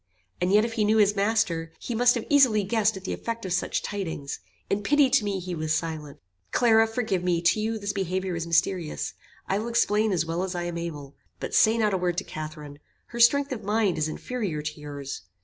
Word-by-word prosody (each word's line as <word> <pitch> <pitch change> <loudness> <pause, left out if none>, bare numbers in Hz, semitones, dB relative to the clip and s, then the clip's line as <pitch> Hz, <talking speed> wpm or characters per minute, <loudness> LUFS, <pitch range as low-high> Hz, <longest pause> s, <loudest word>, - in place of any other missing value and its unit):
And 180 +1 +1
yet 210 +2 +5
if 230 - -4
he 220 -2 +1
knew 215 +1 +3
his 205 -1 +4
master, 200 -6 0
he 240 - -5
must 245 +2 +4
have 235 - -3
easily 255 -8 +5
guessed 215 0 +1
at 190 - -10
the - - -3
effect 230 -2 -5
of 185 - -2
such 180 - -1
tidings. 165 -8 -4 0.3
In 200 - 0
pity 280 +4 +3
to 265 -4 +4
me 200 -2 -1
he 180 0 -5
was 155 -1 -1
silent." 155 -3 -4 0.3
"Clara, 225 - +4
forgive 220 -5 -1
me; 175 -2 +1
to 170 +5 +3
you, 220 +1 -1
this 205 -1 -3
behaviour 190 -1 -2
is 165 0 -4
mysterious. 165 - 0 0.3
I 195 - 0
will 220 - -4
explain 220 -2 +2
as 170 -3 +1
well 165 +2 -2
as 190 -1 -3
I 175 - -2
am 175 -1 -4
able. 145 -5 -6 0.3
But - - -5
say 220 +1 +5
not 215 -3 +2
a 190 - +1
word 175 -1 -1
to 195 - 0
Catharine. 155 -2 -8 0.3
Her 235 - -7
strength 280 +4 +5
of 225 -5 -4
mind 205 -4 +1
is 155 - +1
inferior 180 -3 -4
to 155 0 -5
your's. 145 -2 -6
195 Hz, 225 wpm, -26 LUFS, 165-220 Hz, 0.3 s, yet